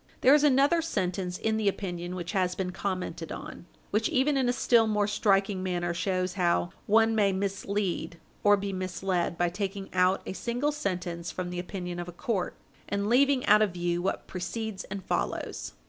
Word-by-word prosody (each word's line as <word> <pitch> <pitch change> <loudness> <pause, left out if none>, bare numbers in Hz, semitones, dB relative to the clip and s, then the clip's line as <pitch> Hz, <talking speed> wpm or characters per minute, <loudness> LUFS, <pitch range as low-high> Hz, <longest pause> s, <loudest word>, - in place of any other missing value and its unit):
There 265 - +7
is 295 0 +5
another 285 +4 +4
sentence 185 - -2
in 220 0 0
the 215 -2 0
opinion 180 -2 -2
which 175 -2 -4
has 180 -2 +1
been 185 -1 -2
commented 185 -3 -4
on, 175 - -8 0.2
which 215 +2 +1
even 275 +3 +2
in 260 -2 +2
a - - +4
still 235 -2 +4
more 210 -1 +2
striking 200 -2 +2
manner 175 -2 -1
shows 185 +1 -1
how 170 - +1 0.2
one 225 +2 +4
may 205 -3 +3
mislead 195 -2 -2 0.3
or 205 0 +6
be 200 0 -3
misled 185 -2 -1
by 175 0 +2
taking 195 +1 -4
out 185 +1 +3
a - - -4
single 245 +8 -1
sentence 180 - -3
from 180 -1 -4
the 180 - -3
opinion 180 -1 -5
of 175 - -5
a - - -6
court, 190 +1 -2 0.3
and 200 +1 -1
leaving 265 +1 +4
out 210 +1 +6
of 205 -4 +2
view 175 0 -1
what 190 - -2
precedes 205 +2 -4
and 195 -3 -6
follows. - - -2
195 Hz, 185 wpm, -28 LUFS, 180-220 Hz, 0.3 s, There